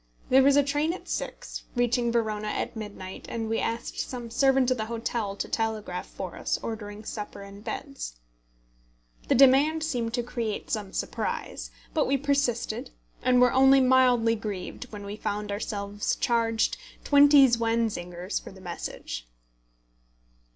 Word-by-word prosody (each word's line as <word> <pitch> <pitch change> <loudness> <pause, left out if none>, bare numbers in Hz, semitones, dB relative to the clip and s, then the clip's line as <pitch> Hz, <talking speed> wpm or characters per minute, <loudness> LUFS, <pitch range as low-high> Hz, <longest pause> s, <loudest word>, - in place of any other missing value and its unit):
There 265 +1 +7
was 275 +1 +5
a 285 - +6
train 290 +4 0
at 370 - -9
six, - - -5
reaching 240 0 +2
Verona 215 -2 0
at 210 - -2
midnight, 205 -4 -7
and 225 -1 -3
we 225 0 0
asked 230 +1 -3
some 240 -3 -5
servant 265 0 +3
of 255 - +2
the 220 - -2
hotel 230 -3 -2
to - - -3
telegraph 220 -5 -2
for 185 -3 -7
us, - - -1
ordering 210 -1 -6
supper 210 -2 -6
and 200 +1 -11
beds. - - -5 1.1
The - - +3
demand 275 +5 +5
seemed 240 -6 -1
to 240 - -1
create 230 -3 -4
some 210 -4 -2
surprise; - - -3 0.2
but 310 - +2
we 275 - +2
persisted, 280 -4 0 0.3
and 250 -1 +4
were 250 -1 +5
only 270 +1 +7
mildly 255 -3 +4
grieved 210 +3 -6
when 205 -2 -7
we 200 +1 -5
found 210 -1 -3
ourselves 205 0 -2
charged 230 -2 +1 0.3
twenty 285 -1 +7
zwanzigers 225 -6 -1
for - - -9
the 190 - -14
message. 115 - -6
230 Hz, 150 wpm, -27 LUFS, 205-255 Hz, 1.1 s, There